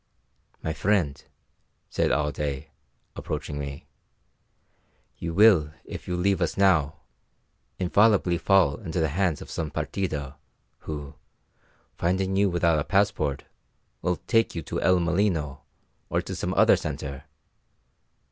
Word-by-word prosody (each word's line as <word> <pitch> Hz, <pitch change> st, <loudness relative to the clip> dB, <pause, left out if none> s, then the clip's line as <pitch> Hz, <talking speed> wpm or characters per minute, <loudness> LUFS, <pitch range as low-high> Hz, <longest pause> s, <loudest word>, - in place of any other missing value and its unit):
"My 80 Hz, -, -1 dB
friend," 85 Hz, -5 st, 0 dB, 0.6 s
said -, -, 0 dB
Alday, 70 Hz, -1 st, -2 dB, 0.4 s
approaching 75 Hz, -1 st, -4 dB
me, 70 Hz, 0 st, -6 dB, 1.3 s
"you 85 Hz, -, -3 dB
will, 85 Hz, -6 st, +5 dB
if -, -, -8 dB
you 90 Hz, -, -2 dB
leave 95 Hz, 0 st, +1 dB
us 85 Hz, -, -1 dB
now, 85 Hz, -7 st, +3 dB, 0.8 s
infallibly 95 Hz, -2 st, +3 dB
fall 95 Hz, -8 st, +3 dB
into 90 Hz, -4 st, -4 dB
the 80 Hz, -1 st, +1 dB
hands 85 Hz, 0 st, 0 dB
of -, -, -12 dB
some 80 Hz, -2 st, -3 dB
partida, 75 Hz, -6 st, -3 dB, 0.5 s
who, 75 Hz, -2 st, -5 dB, 0.8 s
finding 95 Hz, +2 st, 0 dB
you 100 Hz, 0 st, +3 dB
without 85 Hz, -3 st, +2 dB
a -, -, 0 dB
passport, 95 Hz, -9 st, +1 dB, 0.6 s
will 90 Hz, +1 st, +1 dB
take 115 Hz, -4 st, +2 dB
you 85 Hz, -, -3 dB
to -, -, -4 dB
El 90 Hz, -1 st, +4 dB
Molino, 85 Hz, -5 st, 0 dB, 0.5 s
or -, -, +1 dB
to -, -, -5 dB
some -, -, -3 dB
other -, -, +6 dB
centre. 70 Hz, +1 st, -5 dB
85 Hz, 125 wpm, -26 LUFS, 75-95 Hz, 1.3 s, other